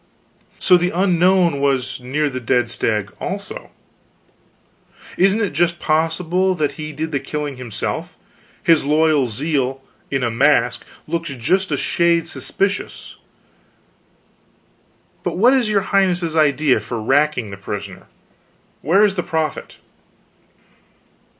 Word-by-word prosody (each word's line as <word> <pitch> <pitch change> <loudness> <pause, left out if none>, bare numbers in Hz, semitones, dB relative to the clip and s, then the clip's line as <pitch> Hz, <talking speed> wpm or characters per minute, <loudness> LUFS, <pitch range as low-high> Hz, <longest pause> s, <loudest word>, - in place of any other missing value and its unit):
"So 180 - +5
the 180 +1 0
Unknown 180 -3 +2
was 135 -3 0
near 140 +5 -1
the 130 -2 -4
dead 120 0 0
stag, 105 -5 -1
too? - - -6 1.5
Isn't 195 +4 +3
it 205 -8 -1
just 170 +3 +1
possible 170 +4 0
that 150 -4 0
he 155 +2 -7
did 160 +2 -4
the 140 - 0
killing 145 0 -5
himself? 120 -5 -4 0.5
His 165 -2 +4
loyal 150 -2 +2
zeal 135 +1 -2 0.3
in 135 -2 -1
a 120 - 0
mask 125 0 +2 0.2
looks 170 +1 -3
just 155 +9 0
a 145 - +1
shade 170 +2 +1
suspicious. 195 +4 -3 2.0
But - - -3
what 240 +7 +5
is 250 -5 +2
your 205 -2 +2
highness's 180 -4 +1
idea 145 -4 +3
for 110 +2 -5
racking 135 -1 +1
the 95 - -8
prisoner? 95 -1 -7 0.7
Where 190 +8 +3
is 205 -2 +3
the 185 - -1
profit?" 160 -3 -3
155 Hz, 125 wpm, -19 LUFS, 130-175 Hz, 2.0 s, So